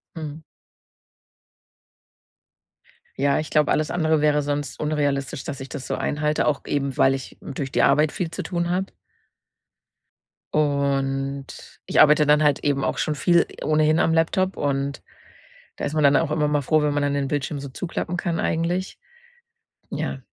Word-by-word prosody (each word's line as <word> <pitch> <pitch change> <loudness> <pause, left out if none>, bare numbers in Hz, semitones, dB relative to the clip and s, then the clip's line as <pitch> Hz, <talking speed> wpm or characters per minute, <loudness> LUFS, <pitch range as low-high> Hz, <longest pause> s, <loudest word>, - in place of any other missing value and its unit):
Mhm. 155 -1 -7 2.8
Ja, 140 0 +2
ich 155 - -4
glaube, 150 -1 +3
alles 155 -1 +1
andere 160 -3 +1
wäre 150 0 +3
sonst 145 -1 -3
unrealistisch, 145 -3 -1
dass 145 -3 -6
ich 135 0 -8
das 140 -3 -6
so - - -3
einhalte, 150 +1 0
auch 150 -2 +1
eben, 140 -2 -2
weil 135 - +4
ich 135 -1 -7
durch 135 -1 -5
die - - +2
Arbeit 150 0 +4
viel 170 -2 -3
zu - - -4
tun 175 -1 -2
habe. 190 +2 0 1.7
Und 140 -2 -1
ich - - +1
arbeite 150 0 +6
dann 150 +1 +5
halt 145 -2 +2
eben 140 -2 +1
auch - - -1
schon 155 - 0
viel 170 +3 +3 0.2
ohnehin 155 0 +3
am 165 - +2
Laptop 185 +4 +1
und 140 0 -2 0.7
da - - -7
ist 145 - -2
man 155 - +1
dann 140 0 +5
auch 155 +1 +1
immer 150 -1 +1
mal 150 0 +1
froh, 155 +3 +2
wenn 150 -1 +1
man 145 - 0
dann 145 0 0
den 140 -1 -1
Bildschirm 145 +1 -2
so 140 - -6
zuklappen 170 +4 -4
kann 170 -1 -2
eigentlich. 175 +3 -1 0.9
Ja. - - -3
150 Hz, 165 wpm, -23 LUFS, 140-155 Hz, 2.8 s, arbeite